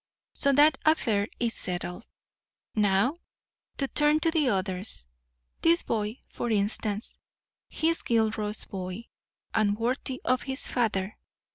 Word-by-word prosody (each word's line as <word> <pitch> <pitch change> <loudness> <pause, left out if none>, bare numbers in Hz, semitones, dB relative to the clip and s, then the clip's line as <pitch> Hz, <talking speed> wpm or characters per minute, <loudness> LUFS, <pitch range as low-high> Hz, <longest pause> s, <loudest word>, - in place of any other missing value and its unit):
So 280 - +2
that 295 +1 +5
affair 225 -10 +2
is 235 -1 0
settled. 180 +3 -4 0.7
Now, 210 - +2 0.6
to 275 - 0
turn 295 +2 +3
to 330 - +2
the 310 -5 +2
others. 190 - -1 0.5
This 335 +1 +4
boy, 215 +2 -2
for 240 - -4
instance; 210 0 0 0.5
he 320 - +1
is 330 - +1
Gilroy's 220 -2 0
boy 185 +4 -6 0.4
and 210 -2 +2
worthy 255 +3 -2
of 255 0 +2
his 265 0 -2
father. 215 -5 -1
225 Hz, 125 wpm, -28 LUFS, 205-270 Hz, 0.7 s, that